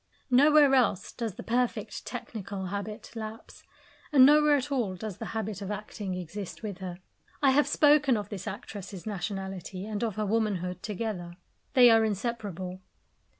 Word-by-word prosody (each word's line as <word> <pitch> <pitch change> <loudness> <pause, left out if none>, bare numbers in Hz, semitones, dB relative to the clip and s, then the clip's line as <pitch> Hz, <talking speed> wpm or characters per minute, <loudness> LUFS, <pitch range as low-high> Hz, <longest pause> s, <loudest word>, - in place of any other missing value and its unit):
Nowhere 290 +2 +6
else 235 -8 +2
does 225 -6 -4
the - - -8
perfect 245 +1 -1
technical 200 -3 -5
habit 200 +3 -5
lapse, 220 -1 -8 0.5
and 265 -4 +8
nowhere 300 +1 +6
at 285 +1 -2
all 230 -9 0
does 200 0 -6
the - - -5
habit 215 -2 -3
of 195 - -5
acting 205 -2 -4
exist 185 +4 -7
with 200 -4 -5
her. 180 -2 -6 0.5
I 270 - +6
have 290 +2 +4
spoken 295 -4 +4
of 205 - -5
this 195 -3 -6
actress's 200 -2 -7
nationality 195 -2 -4
and 215 0 -3
of 220 -4 -1
her 215 - -1
womanhood 195 -4 -1
together. 205 -5 -4 0.4
They 250 -3 +8
are 225 0 +5
inseparable. 200 -4 -3
210 Hz, 155 wpm, -29 LUFS, 190-240 Hz, 0.5 s, and